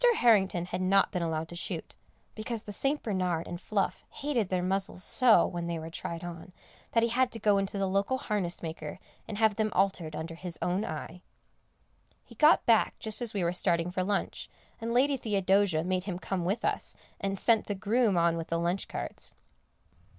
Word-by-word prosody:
Harrington 195 Hz, -, +3 dB
had 180 Hz, +1 st, -4 dB
not 195 Hz, +1 st, +3 dB
been 180 Hz, -, -2 dB
allowed 160 Hz, -1 st, -2 dB
to 175 Hz, -, -6 dB
shoot, 170 Hz, -, -4 dB, 0.4 s
because 220 Hz, 0 st, -4 dB
the 205 Hz, -, -7 dB
St. 280 Hz, +7 st, 0 dB
Bernard 180 Hz, -6 st, -1 dB
and 175 Hz, +1 st, -7 dB
Fluff 200 Hz, -1 st, -1 dB
hated 255 Hz, -9 st, -1 dB
their 180 Hz, -1 st, 0 dB
muzzles 190 Hz, 0 st, 0 dB
so, 245 Hz, -3 st, +6 dB
when 170 Hz, -1 st, -4 dB
they 170 Hz, -1 st, -2 dB
were 160 Hz, +1 st, -7 dB
tried 170 Hz, +1 st, -5 dB
on, 175 Hz, +1 st, -8 dB, 0.4 s
that 230 Hz, -, +4 dB
he 230 Hz, -, +2 dB
had 250 Hz, +2 st, +2 dB
to -, -, -4 dB
go 205 Hz, -2 st, +3 dB
in 195 Hz, -, 0 dB
to 200 Hz, -, -6 dB
the 195 Hz, -, +1 dB
local 200 Hz, +7 st, +1 dB
harness 200 Hz, -9 st, -3 dB
maker 160 Hz, -1 st, -6 dB, 0.3 s
and 215 Hz, -, -5 dB
have 220 Hz, -2 st, +3 dB
them 215 Hz, -1 st, +1 dB
altered 180 Hz, -5 st, +1 dB
under 165 Hz, +2 st, -5 dB
his 170 Hz, 0 st, -7 dB
own 185 Hz, +4 st, 0 dB
eye. 165 Hz, +1 st, -6 dB, 1.0 s
He -, -, -16 dB
got 305 Hz, +1 st, +5 dB
back 230 Hz, -2 st, +3 dB
just 220 Hz, +2 st, -2 dB
as 230 Hz, -3 st, -3 dB
we 195 Hz, -, 0 dB
were 170 Hz, +1 st, +1 dB
starting 170 Hz, -1 st, +1 dB
for 185 Hz, 0 st, -1 dB
lunch, 200 Hz, +1 st, -2 dB, 0.3 s
and 230 Hz, 0 st, -3 dB
Lady 270 Hz, +3 st, +3 dB
Theodosia 195 Hz, -6 st, +2 dB
made 185 Hz, +1 st, -1 dB
him 185 Hz, -4 st, -3 dB
come 185 Hz, -1 st, -3 dB
with 200 Hz, +6 st, -1 dB
us, -, -, -2 dB, 0.2 s
and 195 Hz, 0 st, -2 dB
sent 225 Hz, +2 st, +3 dB
the 205 Hz, -, -2 dB
groom 210 Hz, 0 st, +2 dB
on 170 Hz, 0 st, +3 dB
with 165 Hz, 0 st, -4 dB
the 165 Hz, -, -1 dB
lunch 175 Hz, +3 st, -1 dB
carts. -, -, -6 dB
190 Hz, 200 wpm, -29 LUFS, 175-215 Hz, 1.0 s, so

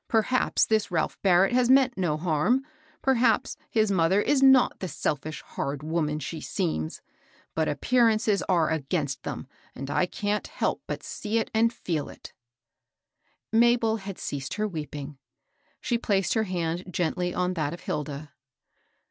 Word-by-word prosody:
Per 225 Hz, -1 st, +3 dB
haps 255 Hz, +2 st, +2 dB
this 215 Hz, -2 st, +1 dB
Ralph 165 Hz, -4 st, -1 dB
Barrett 190 Hz, +2 st, +4 dB
has 250 Hz, -1 st, +3 dB
meant 265 Hz, -1 st, +5 dB
no 175 Hz, -5 st, 0 dB
harm; 175 Hz, -, +1 dB, 0.4 s
per 265 Hz, -, +4 dB
haps 245 Hz, +1 st, +2 dB
his 220 Hz, -2 st, +2 dB
mother 185 Hz, +1 st, +3 dB
is 270 Hz, +5 st, +2 dB
not 265 Hz, -2 st, +5 dB
the 185 Hz, -, -3 dB
selfish, 150 Hz, -2 st, -3 dB
hard 140 Hz, +1 st, -4 dB
woman 155 Hz, -1 st, -1 dB
she 155 Hz, +1 st, -5 dB
seems; 155 Hz, -, -3 dB, 0.5 s
but 160 Hz, -1 st, 0 dB
appearances 220 Hz, -, +2 dB
are 170 Hz, -4 st, +3 dB
against 145 Hz, -3 st, -2 dB
them, -, -, -5 dB, 0.3 s
and 135 Hz, +2 st, -5 dB
I 150 Hz, +5 st, +2 dB
can't 210 Hz, +3 st, -2 dB
help -, -, -2 dB
Lut -, -, -4 dB
see 215 Hz, +1 st, -3 dB
it 225 Hz, -, -1 dB
and 225 Hz, +1 st, +3 dB
feel 165 Hz, -10 st, -3 dB
it/* -, -, -12 dB, 1.2 s
Mabel 230 Hz, -1 st, +4 dB
had 195 Hz, -2 st, -7 dB
ceased 135 Hz, -2 st, -4 dB
her 215 Hz, 0 st, 0 dB
weeping. 150 Hz, -5 st, -6 dB, 0.6 s
She 235 Hz, -2 st, 0 dB
placed 195 Hz, -4 st, +1 dB
her 220 Hz, -1 st, +1 dB
hand 175 Hz, -2 st, -2 dB
gently 180 Hz, 0 st, -1 dB
on 180 Hz, 0 st, 0 dB
that 155 Hz, -4 st, -1 dB
of 170 Hz, -, -8 dB
Hilda. 150 Hz, -1 st, -4 dB
185 Hz, 155 wpm, -27 LUFS, 155-225 Hz, 1.2 s, meant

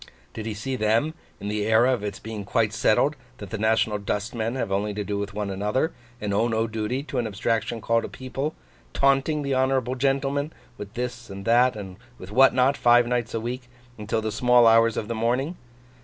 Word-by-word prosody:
Did 110 Hz, 0 st, -6 dB
he 110 Hz, -, -3 dB
see 130 Hz, +5 st, -3 dB
them, 115 Hz, +7 st, +1 dB, 0.3 s
in 100 Hz, -, -6 dB
the 105 Hz, 0 st, -1 dB
era 115 Hz, +4 st, +4 dB
of 120 Hz, -, -2 dB
its 100 Hz, -2 st, -4 dB
being 110 Hz, -2 st, -6 dB
quite 110 Hz, +1 st, 0 dB
settled 125 Hz, +5 st, +2 dB, 0.2 s
that 100 Hz, -3 st, -9 dB
the -, -, -2 dB
national 110 Hz, -1 st, +2 dB
dustmen 110 Hz, +3 st, -2 dB
have 125 Hz, -6 st, -2 dB
only 100 Hz, +1 st, -1 dB
to 105 Hz, -, -2 dB
do 100 Hz, 0 st, -3 dB
with 100 Hz, -1 st, -5 dB
one 105 Hz, -1 st, -2 dB
another, 105 Hz, -, -1 dB, 0.3 s
and 105 Hz, -1 st, -2 dB
owe 110 Hz, +4 st, +2 dB
no 115 Hz, -1 st, 0 dB
duty 110 Hz, +4 st, -3 dB
to 140 Hz, -3 st, -3 dB
an 120 Hz, -, -1 dB
abstraction 115 Hz, +2 st, -1 dB
called 115 Hz, +2 st, +1 dB
a -, -, -5 dB
People, 135 Hz, +4 st, -4 dB, 0.4 s
'taunting 140 Hz, +2 st, +2 dB
the 140 Hz, -1 st, -1 dB
honourable 130 Hz, -1 st, +1 dB
gentleman' 140 Hz, +3 st, 0 dB, 0.2 s
with 105 Hz, -2 st, -9 dB
this 125 Hz, 0 st, -4 dB
and 100 Hz, 0 st, -7 dB
with -, -, -11 dB
that 125 Hz, +2 st, +4 dB
and 95 Hz, -3 st, -8 dB, 0.2 s
with 95 Hz, +2 st, -10 dB
what 135 Hz, +4 st, +6 dB
not, 130 Hz, +2 st, +3 dB
five 120 Hz, 0 st, +5 dB
nights 120 Hz, -2 st, -1 dB
a -, -, 0 dB
week, 120 Hz, +2 st, -5 dB, 0.3 s
until 110 Hz, 0 st, -2 dB
the 110 Hz, -, -1 dB
small 125 Hz, +2 st, +4 dB
hours 115 Hz, 0 st, +5 dB
of 105 Hz, -, -2 dB
the 115 Hz, -, -2 dB
morning? 125 Hz, +9 st, 0 dB
115 Hz, 215 wpm, -25 LUFS, 105-130 Hz, 0.4 s, what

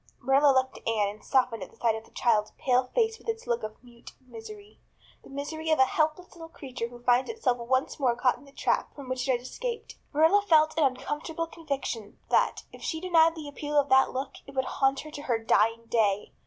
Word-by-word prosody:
Marilla 275 Hz, +3 st, +4 dB
looked 260 Hz, 0 st, +1 dB
at -, -, -12 dB
Anne 215 Hz, -3 st, +1 dB
and 210 Hz, +1 st, -11 dB
softened 250 Hz, -5 st, +1 dB
at 185 Hz, -, -9 dB
sight 230 Hz, -2 st, +2 dB
of 220 Hz, 0 st, -7 dB
the -, -, -20 dB
child's 215 Hz, -3 st, +1 dB
pale 255 Hz, 0 st, +2 dB
face 450 Hz, -2 st, +1 dB
with -, -, -8 dB
its 450 Hz, 0 st, -3 dB
look 235 Hz, 0 st, -1 dB
of 215 Hz, 0 st, -6 dB
mute 240 Hz, -1 st, -14 dB
misery 425 Hz, -, -11 dB, 0.4 s
the -, -, -15 dB
misery 310 Hz, +3 st, -5 dB
of 315 Hz, -, +4 dB
a 265 Hz, -, +6 dB
helpless 310 Hz, +6 st, -1 dB
little 330 Hz, -1 st, -10 dB
creature 260 Hz, -7 st, -6 dB
who 240 Hz, 0 st, -14 dB
finds 245 Hz, +1 st, +3 dB
itself 275 Hz, -, 0 dB
once 260 Hz, +4 st, -1 dB
more 250 Hz, -4 st, +2 dB
caught 245 Hz, +1 st, +2 dB
in -, -, -17 dB
the 275 Hz, -, -16 dB
trap -, -, -1 dB
from 280 Hz, -3 st, -9 dB
which 255 Hz, 0 st, -2 dB
it -, -, +5 dB
had 240 Hz, -, -1 dB
escaped. 470 Hz, -, -6 dB
Marilla 320 Hz, +7 st, +4 dB
felt 315 Hz, -5 st, +4 dB
an 310 Hz, -2 st, +3 dB
uncomfortable 295 Hz, +5 st, -2 dB
conviction 275 Hz, -10 st, -5 dB
that, -, -, +2 dB
if -, -, -12 dB
she 320 Hz, -, -3 dB
denied 330 Hz, -2 st, +4 dB
the 310 Hz, -3 st, -7 dB
appeal 295 Hz, +1 st, -3 dB
of 285 Hz, -, 0 dB
that 265 Hz, 0 st, +5 dB
look, 265 Hz, +1 st, -4 dB
it 275 Hz, -, -12 dB
would 265 Hz, 0 st, +1 dB
haunt 270 Hz, +1 st, +1 dB
her 305 Hz, -, -10 dB
to 290 Hz, -, -7 dB
her 245 Hz, -5 st, 0 dB
dying 225 Hz, 0 st, +2 dB
day. 210 Hz, -4 st, +1 dB
270 Hz, 225 wpm, -28 LUFS, 240-315 Hz, 0.4 s, a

